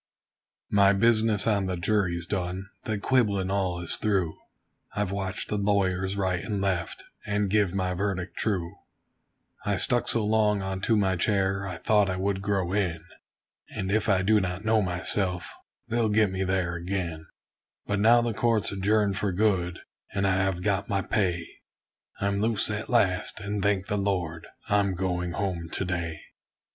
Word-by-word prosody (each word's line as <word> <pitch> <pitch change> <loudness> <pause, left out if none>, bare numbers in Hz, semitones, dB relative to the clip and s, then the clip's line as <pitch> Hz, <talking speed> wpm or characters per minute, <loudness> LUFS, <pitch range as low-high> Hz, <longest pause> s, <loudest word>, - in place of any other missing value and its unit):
My 100 -1 +5
business 110 0 +3
on 100 -4 +1
the 95 -1 -2
jury's 85 -2 0
done 95 +1 -3
the 110 -3 -1
quibblin' 100 -5 +1
all 95 -3 0
is 85 - 0
through 95 -7 0 0.6
I've 105 -2 -1
watched 95 0 -3
the 105 - -1
lawyers 95 -1 +1
right 95 -3 0
and 105 -2 -2
left, 95 -4 -2 0.2
and 105 -1 -1
give 100 -3 +2
my 90 -1 0
verdict 90 -2 -2
true; 90 -6 -1 0.9
I 100 -2 0
stuck 120 +5 +2
so 115 -3 +1
long 105 -2 +2
unto 95 +4 0
my 95 -3 +2
chair, 100 0 +1
I 90 -3 -5
thought 105 -2 +3
I 95 - -1
would 95 +1 -1
grow 95 -3 -1
in; 85 -6 0 0.7
And 95 0 -3
if 110 +1 +1
I 95 -2 +3
do 105 +2 +4
not 95 +1 -3
know 110 0 +3
myself, 90 0 -1 0.3
they'll 115 -1 +1
get 105 -2 +3
me 95 0 -1
there 90 -2 0
ag'in; 85 -3 -4 0.6
But 100 -1 -1
now 120 +3 +5
the 120 -1 -1
court's 115 -1 +1
adjourned 100 +1 +1
for 100 - 0
good, 90 -3 0 0.3
and 100 0 +1
I 95 -1 +2
have 95 -2 0
got 100 +1 0
my 100 -2 0
pay; 90 -5 0 0.7
I'm 100 0 0
loose 110 -1 +1
at 105 +1 -4
last, 95 -5 +1
and 100 0 -3
thank 100 -1 +1
the 105 0 -1
Lord, 90 -5 -2 0.2
I'm 100 -2 +2
going 90 -1 -2
home 90 -3 -3
to 95 - -1
day. 85 -3 -3
100 Hz, 165 wpm, -27 LUFS, 90-105 Hz, 0.9 s, My